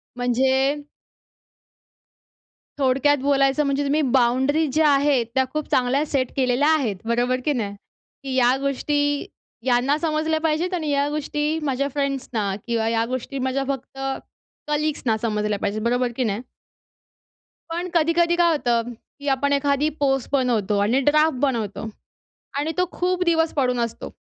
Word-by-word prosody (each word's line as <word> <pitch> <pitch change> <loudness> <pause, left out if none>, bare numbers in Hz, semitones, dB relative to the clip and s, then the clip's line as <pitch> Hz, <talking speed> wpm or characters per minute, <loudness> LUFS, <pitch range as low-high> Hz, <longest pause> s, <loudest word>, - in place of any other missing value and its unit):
म्हणजे? 265 +4 +1 2.0
थोडक्यात 275 +2 +3
बोलायचं 275 +1 +2
म्हणजे 280 +1 0
तुम्ही 290 +2 +1
बाउंडरीज 265 +5 +2
ज्या 310 -1 +4
आहेत 280 -3 +3
त्या 265 - +4
खूप 305 -1 -2
चांगल्या 260 +4 +2
सेट 265 -4 -1
केलेल्या 260 +2 +2
आहेत. 275 -10 +1
बरोबर 245 +2 +1
की 295 - +2
नाही? 205 -6 -3 0.5
की 270 - -4
या 255 0 +4
गोष्टी 290 +1 0 0.4
यांना 255 +3 +2
समजल्या 315 0 0
पाहिजेत 325 +3 0
आणि 315 -4 -2
या 285 0 +1
गोष्टी 300 +1 -2
माझ्या 275 -1 0
फ्रेंड्सना 260 -8 -2
किंवा 225 -1 0
या 230 0 +1
गोष्टी 255 +2 -4
माझ्या 260 +1 -1
फक्त 270 -1 -5 0.7
कलीग्सना 295 -7 0
समजल्या 210 -2 -1
पाहिजेत. 210 +2 -2
बरोबर 245 +1 +1
की 255 - 0
नाही? 215 0 -1 1.3
पण 345 +2 -3
कधी-कधी 335 +1 +3
काय 345 -1 +4
होतं 240 -6 0
की 285 +5 -14
आपण 280 +1 +1
एखादी 280 +1 +1
पोस्ट 270 -2 +1
बनवतो 235 -7 +1
आणि 225 +6 +2
ड्राफ्ट 305 -1 +4
बनवतो 225 -6 -1 0.7
आणि 305 +3 -1
तो 360 - +4
खूप 365 0 -1
दिवस 325 -1 +2
पडून 250 -4 +1
असतो. 235 -1 -4
275 Hz, 140 wpm, -23 LUFS, 245-300 Hz, 2.0 s, ज्या